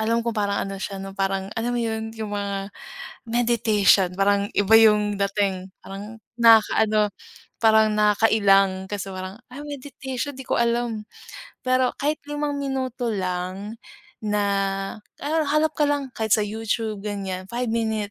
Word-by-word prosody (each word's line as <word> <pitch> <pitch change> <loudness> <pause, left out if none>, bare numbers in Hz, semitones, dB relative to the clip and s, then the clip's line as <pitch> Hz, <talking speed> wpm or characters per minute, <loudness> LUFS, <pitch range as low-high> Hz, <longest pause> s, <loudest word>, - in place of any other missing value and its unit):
Alam 230 +1 +1
ko 235 - 0
parang 205 -2 -1
ano 195 -1 -6
siya 195 0 -4
'no 195 0 -7
parang 195 +1 -2
alam 230 +2 -2
mo - - 0
'yun 220 -1 -2
yung 215 -2 -5
mga, 200 -1 -3 0.6
meditation 225 -5 +3
parang 200 +1 +2
iba 205 +1 +2
yung 210 -2 +4
dating 195 -2 0 0.2
parang 205 +3 -8 0.2
nakaka-ano 215 -2 +5 0.5
parang 220 -1 +5
nakakailang 200 -3 +3
kasi 195 -1 -5
parang, 185 +1 -6 0.2
"ah, 280 - -8
meditation 275 -1 -5
'di 265 -1 -10
ko - - +1
alam" 235 -2 0 0.6
pero 255 0 +2
kahit 295 +2 -1
5 295 -1 -2
minuto 260 -3 -2
lang 190 +2 -3 0.4
na, 210 -1 -1 0.8
ha 290 - -3 0.2
hanap 305 +1 +1
ka 300 - +4
lang 285 -2 -1
kahit 220 -3 +1
sa 215 - +2
YouTube 220 0 -2
ganyan, 190 -2 -4
5 240 +1 -3
minute 220 -3 -1
215 Hz, 145 wpm, -24 LUFS, 200-235 Hz, 0.8 s, nakaka-ano